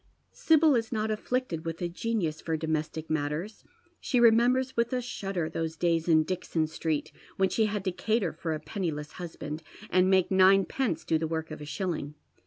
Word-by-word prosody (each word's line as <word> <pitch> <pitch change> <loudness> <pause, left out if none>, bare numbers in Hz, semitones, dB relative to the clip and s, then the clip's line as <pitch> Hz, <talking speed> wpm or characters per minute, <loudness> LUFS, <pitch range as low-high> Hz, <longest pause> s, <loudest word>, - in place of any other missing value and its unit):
Sibyl 315 -2 +4
is 225 -2 -1
not 220 -1 -1
afflicted 215 -6 -2
with 165 -1 -4
a 175 - -1
genius 175 -4 -2
for 160 -1 -1
domestic 160 0 -2
matters. 155 +7 -3 0.4
She 250 - +1
remembers 240 +3 +4
with 235 0 +1
a 250 - +1
shudder 195 -8 -3
those 160 0 -3
days 165 -1 +1
in 160 -2 +5
Dixon 170 -2 -1
Street 155 -1 -2 0.3
when 190 0 +3
she 220 +3 +2
had 205 -1 -3
to 185 - +1
cater 205 -1 0
for 160 0 -3
a - - -5
penniless 155 -2 -4
husband, 155 -2 -6 0.3
and 185 +1 +4
make 190 -1 +3
ninepence 190 0 +3
do 160 - +2
the 160 - -1
Trork 160 0 -3
of 155 - -7
a - - -6
shilling. 155 -3 -3
175 Hz, 185 wpm, -28 LUFS, 160-215 Hz, 0.4 s, in